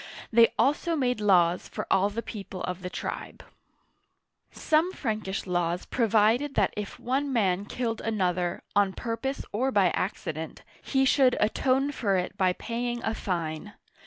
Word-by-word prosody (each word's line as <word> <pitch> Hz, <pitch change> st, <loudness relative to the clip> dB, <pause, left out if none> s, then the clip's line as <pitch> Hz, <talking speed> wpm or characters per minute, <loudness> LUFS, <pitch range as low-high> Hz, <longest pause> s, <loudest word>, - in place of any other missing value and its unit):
They 230 Hz, 0 st, +6 dB
also 295 Hz, +4 st, +2 dB
made 250 Hz, -6 st, 0 dB
laws 180 Hz, -4 st, +3 dB
for -, -, -5 dB
all 195 Hz, +2 st, +4 dB
the 230 Hz, +3 st, -4 dB
people 195 Hz, -4 st, -7 dB
of 180 Hz, 0 st, -4 dB
the 180 Hz, -, -4 dB
tribe. -, -, -6 dB, 1.1 s
Some 320 Hz, +3 st, +1 dB
Frankish 215 Hz, -, -3 dB
laws 175 Hz, -1 st, -1 dB
provided 230 Hz, +4 st, +2 dB
that 200 Hz, -, +2 dB
if 210 Hz, -1 st, -6 dB
one 270 Hz, +3 st, -1 dB
man 200 Hz, -5 st, +1 dB
killed 230 Hz, 0 st, -3 dB
an 220 Hz, -2 st, -2 dB
other, 180 Hz, -1 st, 0 dB
on 200 Hz, -2 st, +3 dB
purpose 235 Hz, +6 st, -3 dB
or 255 Hz, +6 st, 0 dB
by 195 Hz, -6 st, +3 dB
accident, 160 Hz, -4 st, -4 dB, 0.2 s
he 270 Hz, 0 st, +1 dB
should 260 Hz, -1 st, +4 dB
atone 265 Hz, +6 st, +2 dB
for 200 Hz, -8 st, 0 dB
it 180 Hz, 0 st, -3 dB
by 185 Hz, -1 st, +2 dB
paying 240 Hz, +3 st, -3 dB
a 220 Hz, -, 0 dB
fine. 170 Hz, -1 st, -3 dB
215 Hz, 155 wpm, -27 LUFS, 185-250 Hz, 1.1 s, They